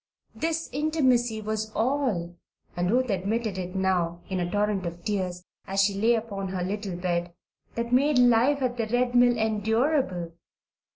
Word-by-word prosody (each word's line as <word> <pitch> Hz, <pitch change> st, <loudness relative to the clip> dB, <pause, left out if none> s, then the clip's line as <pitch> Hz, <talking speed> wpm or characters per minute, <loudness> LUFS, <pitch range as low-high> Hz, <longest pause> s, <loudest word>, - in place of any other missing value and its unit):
This 325 Hz, 0 st, -2 dB
intimacy 255 Hz, -6 st, +1 dB
was 215 Hz, 0 st, -3 dB
all 225 Hz, -9 st, 0 dB, 0.4 s
(and 175 Hz, 0 st, 0 dB
Ruth 250 Hz, +1 st, +2 dB
admitted 200 Hz, +1 st, -1 dB
it 180 Hz, +1 st, -5 dB
now, 180 Hz, -3 st, 0 dB
in 190 Hz, -1 st, -1 dB
a 175 Hz, -1 st, -1 dB
torrent 205 Hz, -1 st, 0 dB
of 170 Hz, 0 st, -7 dB
tears, 185 Hz, -4 st, -2 dB, 0.2 s
as 195 Hz, +1 st, -1 dB
she 200 Hz, 0 st, +2 dB
lay 225 Hz, +4 st, +3 dB
upon 205 Hz, -4 st, -4 dB
her 185 Hz, -1 st, -3 dB
little 200 Hz, 0 st, -3 dB
bed) 175 Hz, -1 st, -2 dB, 0.4 s
that 235 Hz, +1 st, -2 dB
made 280 Hz, +2 st, +4 dB
life 250 Hz, +3 st, +4 dB
at 250 Hz, -1 st, -1 dB
the 225 Hz, -2 st, -1 dB
Red 245 Hz, +2 st, +1 dB
Mill 245 Hz, -1 st, +5 dB
endurable. 220 Hz, -, 0 dB
215 Hz, 160 wpm, -26 LUFS, 185-245 Hz, 0.4 s, Mill